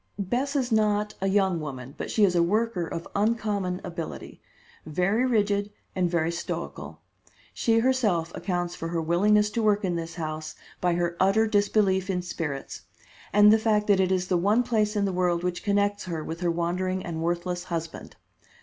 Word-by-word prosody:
"Bess 245 +8 -1
is 255 -3 0
not 210 -1 +2
a 195 - +1
young 190 -3 +2
woman, 135 -3 -7
but - - -5
she 215 - +2
is 190 -3 +4
a 175 - +3
worker 200 0 0
of 165 - -5
uncommon 205 -4 0
ability, 170 -2 -7 0.4
very 195 +10 +1
rigid 205 -3 +1 0.3
and 180 -2 +1
very 170 -1 0
stoical. 170 0 -6 0.5
She 225 -1 +2
herself 225 -9 +1
accounts 175 -2 -2
for 165 - -5
her 165 0 -2
willingness 210 +6 +3
to 230 - -1
work 210 -2 +2
in 180 -2 -1
this 165 0 -5
house 155 -2 -5 0.3
by 175 -1 +2
her 175 0 -1
utter 195 +4 +4
disbelief 205 -2 +2
in 180 -2 -1
spirits, 150 -6 -5 0.5
and 210 +2 +7
the 220 - +4
fact 215 -1 +2
that 200 -2 +3
it 190 -1 +2
is 185 -1 0
the 180 - +2
one 205 +7 +3
place 215 -3 0
in 205 -1 +1
the 195 - -1
world 175 -1 +1
which 180 -1 -2
connects 205 -1 +1
her 165 -3 -4
with 165 +2 -6
her 175 -1 0
wandering 180 +2 -1
and 160 -2 -4
worthless 175 +1 -2
husband. 165 -2 -5
185 Hz, 185 wpm, -26 LUFS, 170-210 Hz, 0.5 s, and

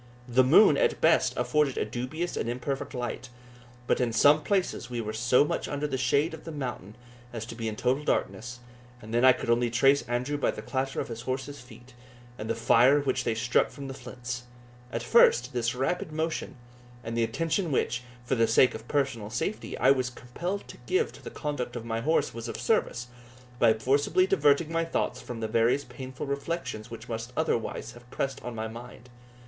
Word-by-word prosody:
The 125 +1 +4
moon, 155 +12 +6
at - - +2
best, - - +3
afforded 150 -3 +1
a - - 0
dubious 130 +10 -4
and - - -2
imperfect 130 +3 -3
light; 125 0 -4 0.6
but - - +1
in 120 -2 +1
some 145 +7 +5
places 185 - -1
we 120 -1 -3
were 110 -1 -3
so 120 +5 +3
much - - -2
under 145 +1 -2
the 145 - -2
shade 145 +5 +2
of 160 - -9
the 165 - -7
mountain 125 - -5 0.4
as 115 -2 -5
to 115 - -8
be 115 -1 -4
in 110 - -3
total 130 +6 0
darkness, 125 -4 -2 0.4
and 110 -1 -10
then 120 +1 +2
I 130 - +9
could 120 -2 -1
only 120 0 +2
trace 135 +4 +4
Andrew 125 +4 -1
by - - +2
the - - -4
clatter 135 0 -2
of - - -3
his 115 0 -6
horse's 130 +3 -4
feet, 120 0 -15 0.4
and 110 -2 -6
the 115 - +1
fire 120 +5 +5
which 135 -3 -1
they 115 - 0
struck 120 +2 +2
from 140 -1 -8
the 135 - -5
flints. 125 -1 -7 0.5
At 115 - -3
first, 125 - +5
this 120 0 0
rapid 135 +5 -1
motion, 160 +1 -3 0.5
and 115 0 -4
the 115 - +2
attention 165 - -1
which, 120 -2 0 0.2
for 125 - -1
the 115 -3 +3
sake 120 +3 +5
of 110 +1 -9
personal 130 -7 -1
safety, 195 - -3
I 130 - +5
was 130 -2 +1
compelled 170 +11 -5
to - - -10
give 390 +5 +1
to - - -13
the - - -6
conduct 145 -5 -4
of 120 -1 -5
my 115 0 -2
horse, 160 +6 +1
was 115 +1 -6
of - - -5
service, 125 - 0 0.5
by 115 -2 +5
forcibly 145 +10 +2
diverting 150 -1 +3
my 165 0 +1
thoughts 165 - -2
from 120 -2 -7
the 110 - -1
various 115 +5 +2
painful 130 +2 -7
reflections 140 -5 -4
which 115 +1 -9
must 115 +1 -5
otherwise 120 -6 -1
have 120 0 -16
pressed 135 +1 -3
on 120 -1 -5
my 110 0 -3
mind. 120 +2 -10
125 Hz, 205 wpm, -28 LUFS, 115-145 Hz, 0.6 s, I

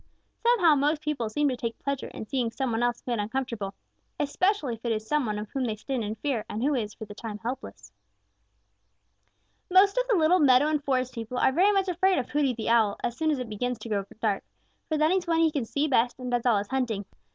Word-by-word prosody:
Somehow 450 -10 +5
most 295 +2 +2
people 285 -8 -2
seem 295 +7 +1
to 255 - -1
take 230 -1 -4
pleasure 280 -1 -3
in - - -8
seeing 250 -1 -1
some 255 +2 -2
one 225 +1 0
else 240 0 0
made 240 -3 -1
uncomfortable, 220 -2 -3 0.4
especially 295 - +1
if 225 - -10
it 235 - -1
is 215 -1 -2
some 295 +1 0
one 210 -1 -2
of 210 +1 -5
whom 270 -2 -2
they 225 -3 -1
stand 245 +2 -3
in 210 +1 -3
fear 235 -1 -2
and 215 +3 -3
who 290 +2 +2
is 220 -5 -2
for 220 - -8
the 205 - -10
time 220 0 -6
being - - -9
helpless. 250 +3 -6 1.8
Most 395 +5 +5
of - - 0
the 460 - +4
little 345 +1 +4
meadow 280 0 +5
and 300 -2 0
forest 255 -2 0
people 230 +1 -5
are 265 - +4
very 370 +9 +4
much 390 -1 +1
afraid 370 +2 +2
of 250 -2 -3
Hooty 285 -4 +1
the 220 - -5
Owl 220 -3 +3
as 240 -1 -1
soon 315 +3 0
as 300 - +1
it 250 -2 -4
begins 245 +3 -2
to 230 - -9
grow 200 -2 0 0.2
dark, 210 -4 0 0.5
for 310 - +1
that 310 +2 +3
is 370 -1 0
when 330 -1 +2
he 325 -1 +4
can 280 -6 -2
see 285 +6 0
best 245 -3 +2
and 250 -1 -5
does 245 0 +1
all 230 -4 +4
his 200 0 -3
hunting. 235 -7 -1
255 Hz, 245 wpm, -27 LUFS, 225-300 Hz, 1.8 s, Somehow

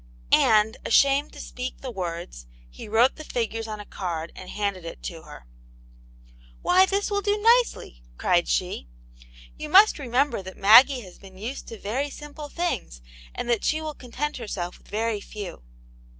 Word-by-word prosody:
And 215 0 +4
ashamed 280 +4 +3
to - - -11
speak 250 +1 -6
the 260 - -5
words, 170 - -6 0.2
he - - -10
wrote 225 +4 +3
the 310 - -8
figures 225 -4 -3
on 215 -1 -5
^ 210 - -9
card 170 -3 -4
and 185 - -10
handed 200 -3 -2
it 165 - -9
to 165 -3 -6
her.. 150 - -13 1.2
"Why, 370 +1 +5
this 400 +2 -1
will 405 0 +1
do 410 +1 0
nicely!" 460 - +2 0.2
cried - - +2
she. - - -1 0.7
"You 305 - -5
jpust 395 +2 +6
remember 255 -2 0
that 190 0 -10
Maggie 245 +6 +7
has 185 -5 -14
been 190 -1 -14
used 230 +8 -6
to 225 - -8
very 250 +9 -2
simple 295 +1 -9
things, 285 - -3 0.3
and - - -4
that 230 - +1
she 310 - +1
will 310 -1 -5
content 285 +3 -4
herself 190 -7 -5
with - - -24
very 215 0 -2
few." 200 - -8
225 Hz, 170 wpm, -25 LUFS, 190-290 Hz, 1.2 s, Maggie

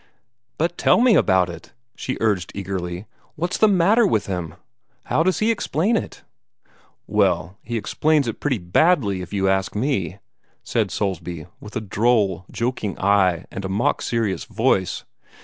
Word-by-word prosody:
"But 170 +2 -1
tell - - +4
me 245 -1 +5
about 95 - +4
it!" 85 -2 -10 0.2
she 130 - -4
urged 105 -6 0
eagerly. 90 -1 -4 0.3
"What's 175 +3 -2
the 215 - +6
matter 205 +4 +4
with 105 - +1
him? 90 -4 -4 0.5
How - - +1
does 185 +2 +2
he 220 +2 +2
explain 205 - 0
it?" - - -4 0.8
"Well, 95 -3 0
he 120 +1 -4
explains 150 +5 +1
it 115 - -4
pretty 135 -4 0
badly, 100 - +2
if 90 - -8
you 95 -1 0
ask 95 +1 0
me," 105 - -1 0.5
said - - 0
Soulsby, 90 -5 -3
with 105 - -11
a 110 - -1
droll, 105 -3 +1
joking 115 -4 -3
eye 95 -3 +2
and 95 - -6
a 95 - -3
mock 100 +5 0
serious 115 -5 -1
voice. 110 -4 0
105 Hz, 155 wpm, -22 LUFS, 95-140 Hz, 0.8 s, the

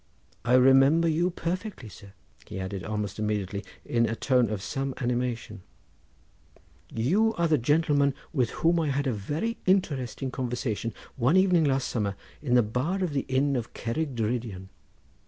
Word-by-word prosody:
I 125 - +3
remember 135 +6 +6
you 165 +3 +2
perfectly, 180 - -4
sir," 100 -1 -13 0.3
he - - -6
added 95 0 -4
almost 105 0 -3
immediately 105 -2 -2 0.2
in 115 -1 +1
a 110 - -2
tone 125 -2 +2
of 105 -3 -3
some 135 +6 -3
animation; 120 -4 -2 1.3
"you 195 - +2
are 170 0 +1
the 155 -3 +3
gentleman 145 +1 +2 0.2
with 125 -7 +1 0.2
whom 170 +1 +4
I 160 - 0
had 140 +1 0
a 130 - +1
very 150 - -3
interesting 135 - 0
conversation 120 -3 -2 0.3
one 130 +8 +3
evening 180 -4 +4
last 135 -2 +1
summer 100 -4 -1 0.3
in 125 -5 +1
the 120 - +6
bar 135 - -1
of 170 -5 -2
the 135 - -1
inn 135 +2 +2
at 120 -2 -4
Cerrig 135 +4 -2
Drudion. 110 -4 -3
130 Hz, 155 wpm, -27 LUFS, 110-155 Hz, 1.3 s, remember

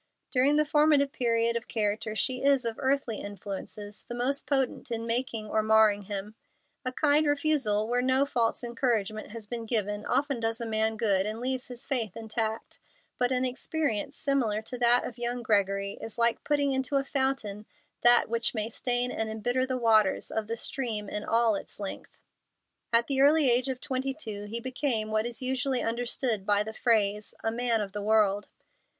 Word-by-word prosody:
During 270 +3 +3
the 305 0 +3
formative 295 -2 +3
period 235 -2 +1
of 235 - -3
character 215 0 -1
she 255 +3 -1
is, 275 -3 +3
of 230 -1 -2
earthly 265 -4 0
influences, 205 +1 -7
the 240 - -7
most 260 +3 -1
potent 270 -3 0
in 230 -1 -2
making 230 -2 -1
or 215 +1 +1
marring 215 -1 +4
him. 205 +1 -5 0.5
A 255 - -2
kind 295 +2 +3
refusal, 280 -8 +2
where 245 +1 +1
no 260 +2 +2
false 240 -3 0
encouragement 230 -3 -1
has 225 0 -8
been 230 +1 -5
given, 210 -2 0
often 280 -3 0
does 225 0 -2
a 235 - -3
man 220 0 0
good, 200 -3 +2
and 215 +1 -4
leaves 255 +1 -2
his 245 +1 -7
faith 235 -8 0
intact; 220 0 -4 0.4
but 250 0 +1
an 255 0 +1
experience 275 -1 -2
similar 240 -7 0
to 250 +3 -6
that 240 0 +4
of 240 - -7
young 240 0 -2
Gregory 200 -2 0
is 225 +1 -6
like 235 0 +1
putting 285 -2 +1
into 265 +1 -1
a 275 - +2
fountain 265 -7 -2 0.3
that 240 0 +6
which 230 +1 -1
may 220 +1 -1
stain 245 +1 0
and 220 0 -2
embitter 245 +4 -1
the 260 -1 -1
waters 220 -5 +2
of 220 -1 -2
the 230 - -2
stream 225 -4 -2
in 210 - -3
all 230 -1 +2
its 200 - -5
length. 200 -2 -7 0.7
At 235 0 +4
the 270 -1 +1
early 290 -2 +6
age 245 +3 +3
of 260 -1 -3
twenty 265 +1 -2
two 215 -9 -6
he 225 +3 -3
became 240 -3 -1
what 215 +1 +1
is 240 +2 -6
usually 260 0 0
understood 235 -2 -1
by 205 +1 +2
the 220 +1 -7
phrase 210 -3 +1
"a 225 - 0
man 235 -1 0
of 200 -2 -4
the 205 +1 -5
world." 205 -1 +2
235 Hz, 185 wpm, -28 LUFS, 215-260 Hz, 0.7 s, that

